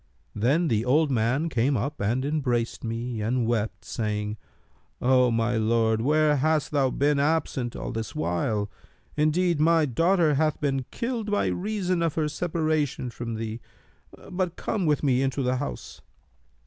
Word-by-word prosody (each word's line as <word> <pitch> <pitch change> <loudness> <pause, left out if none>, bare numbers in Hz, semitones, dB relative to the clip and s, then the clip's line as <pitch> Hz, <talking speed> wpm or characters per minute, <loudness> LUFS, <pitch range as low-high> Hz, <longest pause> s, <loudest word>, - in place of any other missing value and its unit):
Then 140 +11 +2
the 110 -4 +1
old 145 +4 +3
man 125 +6 +1
came 135 -1 +1
up 140 +6 -3
and 120 +6 0
embraced 125 -6 -1
me 115 0 -3
and 120 +3 0
wept, 110 -2 -2
saying, 105 -1 -3 0.6
'O 125 0 +4
my 115 0 +1
lord, 110 0 +2
where 150 +3 +3
hast 155 +1 +1
thou 140 -3 +2
been 140 +2 +1
absent 140 -5 0
all - - -5
this 115 +6 -5
while? 105 - -1 0.5
Indeed, 160 +2 +2
my 165 0 +4
daughter 165 +4 +2
hath 155 +2 +1
been 135 -3 -1
killed 230 -3 -3
by 205 - +1
reason 185 -3 -1
of 165 -3 0
her 155 -2 0
separation 155 -6 -1
from 115 -1 -5
thee; 110 +1 -5 0.7
but 180 -1 -1
come 195 -6 -2
with 150 -1 +1
me 130 -3 +3
into 135 0 0
the 130 +1 +1
house.' 145 - -6
135 Hz, 155 wpm, -26 LUFS, 115-155 Hz, 0.7 s, O